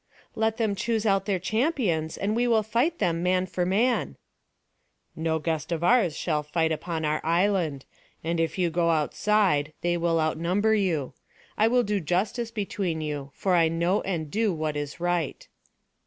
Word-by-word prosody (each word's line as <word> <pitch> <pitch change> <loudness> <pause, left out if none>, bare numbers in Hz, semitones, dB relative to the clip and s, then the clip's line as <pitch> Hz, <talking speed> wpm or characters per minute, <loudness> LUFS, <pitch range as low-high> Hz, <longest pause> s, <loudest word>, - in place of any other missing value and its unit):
"Let 220 0 0
them 220 -4 +1
choose 225 +2 -1
out 195 -2 +2
their 195 -2 +1
champions, 210 - 0
and 210 +2 -1
we 240 +1 +2
will 225 -2 +3
fight 240 +11 0
them, 165 -1 0
man 185 +1 +2
for 180 -1 -2
man." 230 +6 +1 1.0
"No 160 0 0
guest 160 +1 -3
of 165 0 -1
ours 180 -5 +3
shall 155 -3 0
fight 160 +2 0
upon 160 0 -3
our 155 0 0
island; 170 -4 +1 0.4
and 165 +1 -1
if 165 +2 -1
you 175 -2 +1
go 170 +1 +1
outside, 160 -1 +1
they 175 0 +1
will 165 -1 +1
outnumber 170 +7 +1
you. 175 -10 0 0.4
I 215 - +3
will 245 +1 +3
do 205 -2 0
justice 195 +8 -1
between 200 -6 -3
you; 145 -3 -4
for 190 - 0
I 170 -2 +5
know 170 +4 +1
and 160 -6 -3
do 220 0 +1
what 155 -3 -2
is 145 +1 -5
right." 175 -3 -2
175 Hz, 170 wpm, -26 LUFS, 160-210 Hz, 1.0 s, I